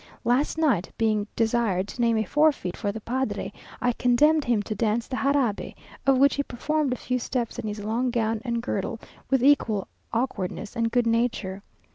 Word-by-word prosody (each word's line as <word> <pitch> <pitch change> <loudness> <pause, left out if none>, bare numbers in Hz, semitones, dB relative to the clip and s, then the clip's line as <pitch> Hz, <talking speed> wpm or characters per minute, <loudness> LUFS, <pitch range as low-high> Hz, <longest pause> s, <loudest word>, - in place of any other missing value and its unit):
Last 250 +6 +1
night, 270 - +2
being 215 -2 +1
desired 225 -5 +1
to 245 - -5
name 230 -1 +3
a 220 - +2
forfeit 290 - +2
for 205 -2 -2
the 220 +2 -7
padre, 260 +4 -2 0.3
I 245 0 +1
condemned 295 +6 +3
him 230 -4 +1
to 215 - -3
dance 220 +2 0
the 255 - -3
jarabe, 270 -7 0 0.3
of 270 -1 +5
which 280 +2 +5
he 285 - 0
performed 285 +2 -1
a - - +1
few 250 +1 -2
steps 240 -1 -3
in - - -4
his 210 0 -5
long 230 +4 0
gown 225 -2 0
and 235 -2 -2
girdle, 225 -1 -2 0.3
with 265 -2 +2
equal 230 -8 +3 0.2
awkwardness 225 -3 -3
and 230 -1 0
good 245 -1 +2
nature. 230 -4 0
235 Hz, 185 wpm, -26 LUFS, 215-260 Hz, 0.3 s, of